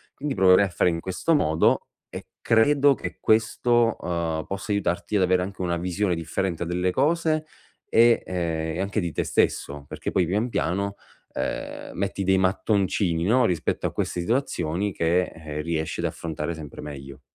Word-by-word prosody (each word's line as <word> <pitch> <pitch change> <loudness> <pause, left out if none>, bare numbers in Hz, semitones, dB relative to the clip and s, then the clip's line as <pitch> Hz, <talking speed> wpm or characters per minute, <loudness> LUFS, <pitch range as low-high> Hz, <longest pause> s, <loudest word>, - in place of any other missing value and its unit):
Quindi 140 -2 -3
proverei 95 +1 +6
a 95 - -4
fare 90 - +2
in 85 - -3
questo 95 - 0
modo, 80 - +2 0.2
e - - -8
credo 140 +5 +4
che - - -6
questo, 115 +1 +2
uhm, 85 -3 -2
possa 100 +2 -4
aiutarti 100 0 -1
ad 95 - +3
avere 90 0 +3
anche 95 +1 -5
una 85 -1 0
visione 90 +2 -1
differente 85 +2 -2
delle 90 +2 0
cose 155 - +1 0.4
e, 115 +1 +5
ehm, 80 -3 -2
e - - -1
anche 100 +2 -1
di 85 -2 -2
te - - -1
stesso, 70 0 0
perché - - -5
poi 90 - +2
pian 105 +7 0
piano, 100 +2 -1 0.4
ehm, - - -4
metti 100 0 -2
dei 95 0 +3
mattoncini, 95 -2 +1
no, 125 +5 +4
rispetto 85 -5 0
a - - -5
queste 90 - -2
situazioni 100 - -1
che, 85 +2 +2
ehm, 75 -3 -7
riesci 80 -1 -2
ad - - -1
affrontare 80 0 -3
sempre 75 -4 -9
meglio. 70 -2 -9
90 Hz, 170 wpm, -25 LUFS, 85-105 Hz, 0.4 s, proverei